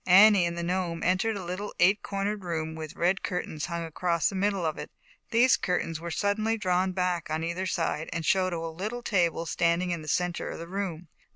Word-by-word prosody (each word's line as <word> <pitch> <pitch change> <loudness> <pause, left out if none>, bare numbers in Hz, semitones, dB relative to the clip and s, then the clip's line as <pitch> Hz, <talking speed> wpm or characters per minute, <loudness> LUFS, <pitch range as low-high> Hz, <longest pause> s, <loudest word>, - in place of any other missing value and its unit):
Annie 195 0 +7
and 170 0 -4
the 170 - -2
Gnome 175 -1 -1
entered 190 +5 +1
a 190 - -6
little 185 +4 -5
eight 195 +4 +5
cornered 200 +1 -2
room, 160 -2 -3
with 160 -1 -7
red 180 +3 +1
curtains 175 -5 -3
hung 170 -1 -3
across 170 0 0
the 195 - -6
middle 195 -2 0
of 155 - -2
it. - - -6 0.4
These 245 +3 +5
cur 180 -1 0
tains 165 -1 -4
were 170 +1 -5
suddenly 210 +6 0
drawn 185 -2 +1
back 180 -3 -1
on 155 +1 -1
either 170 +3 -2
side 165 -3 -1
and 165 -1 -3
showed 185 +2 +2
a 170 - -2
little 190 +9 -4
table 170 -6 +1
standing 170 +2 +1
in 170 -2 -2
the 155 - -10
center 180 +3 -1
of - - -5
the 165 - -7
room. 180 -3 -4
180 Hz, 215 wpm, -28 LUFS, 165-195 Hz, 0.4 s, Annie